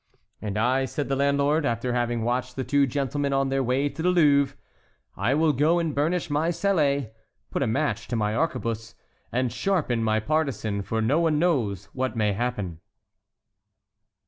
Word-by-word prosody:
"And 105 -1 -3
I," 130 +4 +2
said 140 +2 -4
the 135 - +1
landlord, 140 +3 +2
after 120 -1 -1
having 120 -1 0
watched 125 +1 -1
the 130 - -2
two 140 +1 +2
gentlemen 140 +1 -1
on 135 0 +1
their 135 0 +1
way 130 +3 +1
to 150 - -6
the 180 - +2
Louvre, 140 -5 +3 0.6
"I 120 +8 +1
will 155 0 +3
go 150 +6 +3
and 165 -3 -1
burnish 165 +5 0
my 150 +2 0
sallet, 145 - +1 0.4
put - - -2
a 135 - +2
match 120 0 -1
to 120 - -3
my 105 -1 0
arquebuse, 115 -6 -2 0.4
and 125 -1 0
sharpen 130 -5 0
my 110 0 +2
partisan, 115 -6 -1
for 110 +2 -2
no 140 +8 +2
one 165 -3 +2
knows 120 - 0
what 130 -2 -2
may 105 -2 +2
happen." 105 -7 -3
135 Hz, 170 wpm, -25 LUFS, 115-150 Hz, 0.6 s, Louvre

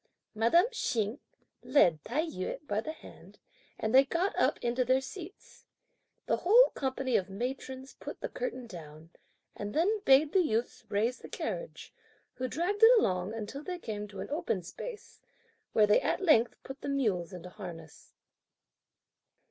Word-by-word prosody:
Madame 235 - +4
Hsing 230 - -1 0.4
led 170 - +3
Tai 290 +7 -1
yü 240 - -5
by 205 +1 0
the 310 - -5
hand - - -14 0.4
and 220 +1 -2
they 265 +1 +8
got 340 +8 -1
up - - +2
into 245 +1 0
their 255 +2 +3
seats. 345 +8 -11 0.6
The - - +1
whole 470 +7 +6
company 265 -2 -2
of 190 - -3
matrons 260 +5 -5
put - - -9
the - - -3
curtain - - -5
down, 160 -5 -11 0.4
and 205 0 -6
then 400 +7 +2
bade 285 +1 +5
the 380 - +5
youths 235 -5 -1
raise 225 +5 0
the - - -11
carriage; - - -5 0.4
who 255 - -3
dragged 360 - -2
it 470 +2 +9
along, 185 - 0
until 225 +6 -5
they 360 +3 -5
came 210 -9 -5
to 195 -2 -8
an - - -7
open 295 - -1
space, 425 - -9 0.5
where 215 - +5
they 210 - +4
at - - 0
length 305 - +4
put 270 +1 -9
the - - -4
mules 210 -11 0
into 180 -1 -8
harness. 165 -6 -10
255 Hz, 160 wpm, -31 LUFS, 205-320 Hz, 0.6 s, it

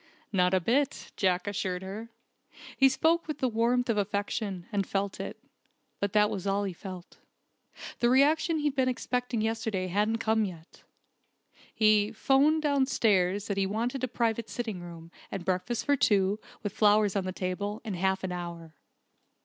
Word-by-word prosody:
"Not 180 -1 +3
a - - +4
bit," 260 +10 0
Jack 185 -1 +1
assured 190 -2 -2
her. 210 +4 -7 0.7
He 270 0 +6
spoke 320 +6 +2
with 305 - -3
the 260 - +1
warmth 240 +2 +1
of 225 -3 +1
affection, 200 -2 -2
and 200 -3 -1
felt 195 0 -2
it. - - -5 0.6
But 200 -1 -1
that 210 -1 +4
was 195 0 -4
all 200 +1 +1
he 195 -2 -3
felt. 185 0 -10 0.8
The 240 - +3
reaction 310 +5 +3
he'd 295 -2 0
been 260 -1 +2
expecting 250 -2 -2
yesterday 220 -4 -1
hadn't 210 +4 +1
come 220 -1 +1
yet! 170 -5 -8 0.9
He 215 -1 +3
'phoned 280 +7 +3
downstairs 210 -9 +2
that 200 - -3
he 195 -1 +1
wanted 240 +6 -2
a - - +2
private 230 -2 -1
sitting 220 -5 -4
room, 170 -1 -10 0.2
and 185 -3 -5
breakfast 185 +6 -1
for 285 - +3
two, 205 -5 +2 0.2
with 205 - -3
flowers 210 -1 +3
on 195 -2 0
the 185 - -2
table, 200 +3 -3
in 215 - -3
half 190 +1 0
an 190 - -2
hour. 170 -2 -6
210 Hz, 165 wpm, -29 LUFS, 190-240 Hz, 0.9 s, He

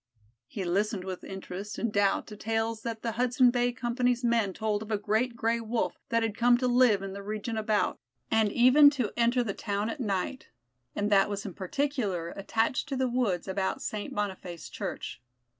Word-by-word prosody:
He 195 - -5
listened 200 +2 0
with 185 -1 -6
interest 190 +2 -7
and 230 -2 -2
doubt 200 -1 +2
to 210 - -10
tales 225 +1 -1
that 225 -1 -5
the 230 - -1
Hudson 250 +2 +3
Bay 245 0 +1
Company's 245 0 0
men 230 -4 +2
told 210 +1 -1
of 220 - -8
a 215 - +1
great 220 +4 0
Gray 230 0 0
wolf 230 +1 -2
that 230 -2 +2
had 220 -2 -1
come 240 +1 +4
to 250 +1 0
live 245 -5 +4
in 195 -1 -5
the 200 - -6
region 215 +3 -4
about, 215 -1 0 0.3
and 220 -2 +3
even 255 +5 +7
to 255 -8 -2
enter 240 +1 +3
the 205 -4 -3
town 205 +2 -2
at 300 - -7
night, 210 +3 -2 0.5
and 205 +1 -1
that 195 0 +5
was 200 0 -4
in 195 - -5
particular 200 - -2
attached 225 +8 -1
to 270 - -2
the 260 0 +1
woods 235 -9 0
about 190 0 -1
St. 210 -1 -4
Boniface 190 -5 -4
Church. - - -5
220 Hz, 190 wpm, -29 LUFS, 200-240 Hz, 0.5 s, even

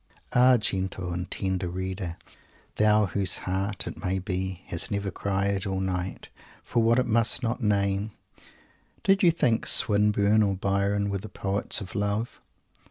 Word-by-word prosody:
Ah, 125 0 +6
gentle 95 -4 -2
and 90 +1 -4
tender 95 -2 -2
reader; 95 -1 -4 0.6
thou 105 0 +4
whose 95 -1 0
heart, 95 +2 -2
it - - -8
may 95 +1 0
be 95 -1 -4
has 85 - -1
never 100 -1 -2
cried 100 +1 -1
all 95 -1 -2
night 95 -1 -4 0.3
for 120 - 0
what 115 +1 +3
it 130 - +2
must 115 +2 +3
not 120 +2 -2
name, 100 -1 +1 0.9
did 195 0 +3
you 175 - +6
think 120 -9 +1
Swinburne 105 0 +4
or 100 -2 +1
Byron 100 +1 0
were 100 - -2
the 110 +3 -9
poets 100 +3 -1
of 95 - -8
"love"? 105 +3 -2
100 Hz, 155 wpm, -26 LUFS, 95-110 Hz, 0.9 s, Ah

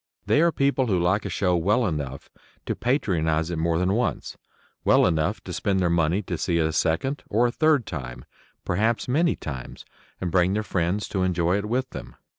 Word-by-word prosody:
They 145 - +3
are 170 0 +4
people 140 -3 +1
who 95 -5 +1
like 95 +5 +1
a - - -2
show 90 0 +1
well 105 +8 +2
enough 70 -7 -4 0.3
to - - -2
patronize 85 - 0
it 85 - -3
more 80 0 +1
than 90 +2 +1
once 120 +3 -2 0.5
well - - +5
enough 80 -3 0
to - - -7
spend 95 -2 0
their 90 -2 +1
money 85 +4 +1
to 85 -3 -4
see 85 -2 0
it 80 - +2
a 80 - -1
second 85 - 0
or 115 +4 +2
a 120 - +1
third 155 -4 +2
time, 65 -5 -7 0.4
perhaps 110 +5 0
many 160 +7 +2
times, 65 -4 -8 0.3
and 90 -2 -3
bring 90 +1 +3
their 110 +1 -1
friends 95 +1 -1
to 95 - -1
enjoy 90 0 +1
it 105 - -4
with 130 +3 -1
them. - - -9
90 Hz, 205 wpm, -25 LUFS, 85-115 Hz, 0.5 s, well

